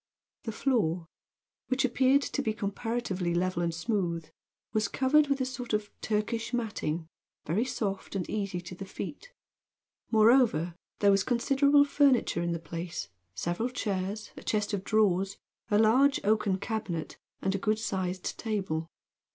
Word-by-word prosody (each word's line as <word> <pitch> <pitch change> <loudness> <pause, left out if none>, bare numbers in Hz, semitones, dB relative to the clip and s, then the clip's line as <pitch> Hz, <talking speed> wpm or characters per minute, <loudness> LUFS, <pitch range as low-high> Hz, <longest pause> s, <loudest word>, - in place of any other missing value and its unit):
The 225 - -2
floor, 200 - +1 0.6
which 260 +1 +2
appeared 260 +3 +3
to 275 - -2
be 220 -5 0
comparatively 200 -4 -2
level 180 0 0
and 170 -1 +1
smooth, 170 -2 -1 0.5
was 215 -2 +2
covered 285 +6 +3
with 280 0 +1
a - - +2
sort 250 -2 -5
of 210 -1 -1
Turkish 225 +2 -1
matting, 175 -9 -2 0.4
very 195 - +1
soft 200 -6 -3
and 185 -3 -2
easy 195 -4 -2
to 175 +1 -9
the 195 +2 -7
feet. - - -7 0.8
Moreover, 220 - +4 0.3
there 200 -1 +6
was 195 -1 +3
considerable 280 +4 +4
furniture 280 -10 +3
in 170 0 -1
the 170 - 0
place, 165 - -5 0.3
several 175 - -1
chairs, 205 -4 -3
a - - -9
chest 210 0 -1
of 195 -2 -1
drawers, 195 -3 +2 0.3
a 205 - +4
large 255 +6 +5
oaken 205 -2 +2
cabinet 195 -6 -4 0.2
and 190 - 0
a 195 - -1
good 215 +2 +1
sized 185 -4 -3
table. 190 -8 -2
210 Hz, 150 wpm, -29 LUFS, 180-240 Hz, 0.8 s, there